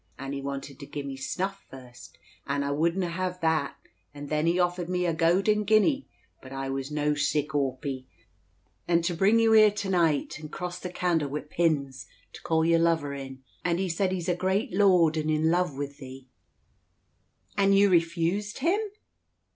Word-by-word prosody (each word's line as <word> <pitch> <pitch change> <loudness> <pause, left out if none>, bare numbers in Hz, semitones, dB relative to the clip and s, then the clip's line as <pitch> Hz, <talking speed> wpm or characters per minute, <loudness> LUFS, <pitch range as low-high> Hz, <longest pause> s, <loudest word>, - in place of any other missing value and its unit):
And 135 0 -6
he 140 - -4
wanted 140 0 -6
to 140 - -9
gie 145 - -5
me 140 -1 -5
snuff 190 +8 -4
first, 125 -2 -13 0.3
and 140 0 -1
I 140 - -1
wouldna 170 +5 0
hev 180 +1 -3
that; 160 -3 0 0.4
and 145 0 -8
then 155 +1 0
he 175 +2 +2
offered 175 0 0
me 180 0 0
a 170 - +1
gowden 190 +6 +2
guinea, 220 +7 +2 0.3
but 130 - -12
I 135 0 -4
was 135 0 -4
no 150 0 0
sic 150 0 0
awpy, 135 -1 -2 0.8
and 170 -1 +2
to 175 +1 0
bring 195 +6 +3
you 225 -1 +4
here 215 -1 +7
to 205 -1 -4
night, 165 -5 +1
and 155 0 -9
cross 180 -1 -5
the 180 - -5
candle 170 -5 0
wi' 150 +2 -3
pins, 145 -5 -1 0.3
to - - -11
call 160 -1 +1
your 165 0 +4
lover 165 -4 +1
in. 135 -1 -8 0.2
And 170 -1 +1
he 190 0 -1
said 185 +3 0
he's 180 -3 -3
a 180 - +2
great 190 +6 -1
lord, 180 -5 +4
and 155 0 -1
in 155 0 +1
luve 175 -5 0
wi' 145 - -1
thee." 130 -1 -10 1.3
"And 195 0 +4
you 200 0 +5
refused 170 +4 0
him?" 345 +9 +1
165 Hz, 185 wpm, -27 LUFS, 140-185 Hz, 1.3 s, here